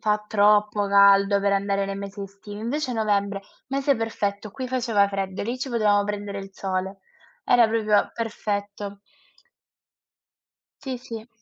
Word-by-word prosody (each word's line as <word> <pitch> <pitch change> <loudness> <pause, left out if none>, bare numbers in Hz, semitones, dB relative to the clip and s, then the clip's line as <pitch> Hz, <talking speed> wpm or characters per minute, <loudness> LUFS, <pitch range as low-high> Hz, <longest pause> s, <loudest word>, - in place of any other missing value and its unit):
fa 210 -1 +1
troppo 210 0 +3
caldo 200 0 +5
per 200 0 +2
andare 200 0 0
nei 195 0 -4
mesi 200 0 -7
estivi, 200 +1 -9
invece 255 +3 -2
novembre, 200 -3 0 0.3
mese 275 +1 +1
perfetto 210 -2 -3
qui 255 +5 -6
faceva 230 -6 +2
freddo, 195 -1 -3
lì 240 +4 -3
ci 265 0 -4
potevamo 210 -3 +3
prendere 205 -1 -4
il 195 - -9
sole. 190 0 -3 0.5
Era 240 -2 +5
proprio 215 -2 +2
perfetto. 205 -3 -4 1.8
Sì, 265 -2 -4
sì. 230 -2 -9
205 Hz, 135 wpm, -24 LUFS, 200-225 Hz, 1.8 s, caldo